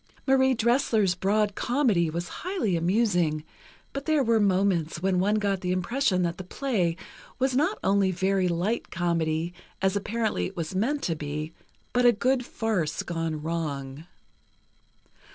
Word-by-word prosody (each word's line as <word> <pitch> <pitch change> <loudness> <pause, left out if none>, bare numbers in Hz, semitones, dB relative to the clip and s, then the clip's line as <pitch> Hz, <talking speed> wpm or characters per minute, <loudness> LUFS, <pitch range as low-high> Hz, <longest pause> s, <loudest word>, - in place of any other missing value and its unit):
Marie 265 -1 +4
Dressler's 225 -5 +2
broad 205 +3 +1
comedy 230 - +1
was 170 +2 -3
highly 340 - -1
amusing, 175 -4 +1 0.5
but 275 0 -5
there 310 -3 +3
were 230 -2 +3
moments 185 -5 +1
when 190 -1 +2
one 205 +3 +2
got 200 -3 0
the 180 - -1
impression 185 +1 +1
that 170 0 -2
the - - -4
play 185 -5 -1 0.4
was 260 0 +1
not 310 +10 +2
only 195 -1 +3
very 190 +1 +1
light 180 +7 -1
comedy, 170 -1 -1 0.3
as 190 +1 +1
apparently 220 +2 -1
it 190 - -12
was 165 +1 -3
meant 255 +10 0
to 165 - 0
be, 150 +1 -4 0.4
but 245 - +3
a 245 - +7
good 250 +3 +1
farce 215 -10 -2
gone 165 -3 -3
wrong. 150 -2 -4
190 Hz, 150 wpm, -27 LUFS, 170-230 Hz, 0.5 s, a